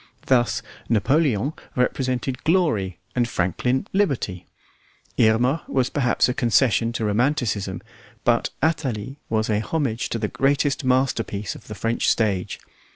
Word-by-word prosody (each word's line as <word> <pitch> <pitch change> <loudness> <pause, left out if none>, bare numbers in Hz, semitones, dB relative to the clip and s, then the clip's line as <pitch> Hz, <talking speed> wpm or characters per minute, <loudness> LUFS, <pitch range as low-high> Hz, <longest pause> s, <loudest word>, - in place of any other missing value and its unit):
Thus 120 -3 +2 0.3
Napoleon 135 +2 +2 0.2
represented 130 0 -1
glory 150 - +1 0.2
and 120 -1 +1
Franklin 125 +9 0
liberty; 135 - 0 0.7
Irma 120 +7 +3
was 130 -1 0
perhaps 125 -5 +2
a 125 - 0
concession 115 -1 +2
to 115 - -2
romanticism, 105 -4 0 0.4
but - - +2
Athalie 135 -5 -1
was 110 -1 +1
a 105 -1 +1
homage 125 -1 -1
to - - -2
the 110 -1 -1
greatest 140 +3 +1
masterpiece 125 -5 0
of - - -14
the 105 - -7
French 115 +4 0
stage. 100 -5 0
120 Hz, 125 wpm, -23 LUFS, 110-135 Hz, 0.7 s, Irma